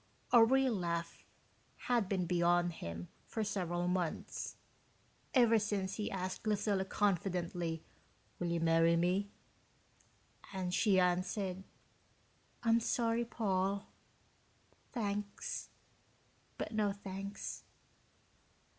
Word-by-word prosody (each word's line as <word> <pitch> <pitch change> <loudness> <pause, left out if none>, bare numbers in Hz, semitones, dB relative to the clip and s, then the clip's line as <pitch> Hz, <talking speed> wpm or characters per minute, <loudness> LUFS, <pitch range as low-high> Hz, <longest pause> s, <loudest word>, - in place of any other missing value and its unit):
A 235 -2 +9
real 260 +1 +4
laugh 170 -3 -3 0.5
had 235 -6 0
been 185 -3 +1
beyond 175 0 +3
him 85 - -6 0.2
for 220 - -2
several 175 -4 -1
months 180 -2 -2 0.8
ever 235 -3 +6
since 200 -2 -1
he 210 - -1
asked 185 +2 -4
Lucilla 205 -2 +1
confidently, 175 -4 0 0.6
"Will 175 - -1
you 170 0 0
marry 165 0 +4
me?" 180 +4 +1 1.2
and 185 -2 -2
she 195 -1 +4
answered, 185 +1 0 1.0
"I'm 230 0 +5
sorry, 230 0 +1
Paul 200 -3 -1 1.0
thanks, 205 -4 -3 0.9
but - - -3
no 215 -2 +1
thanks." 200 0 -6
190 Hz, 95 wpm, -35 LUFS, 175-210 Hz, 1.2 s, A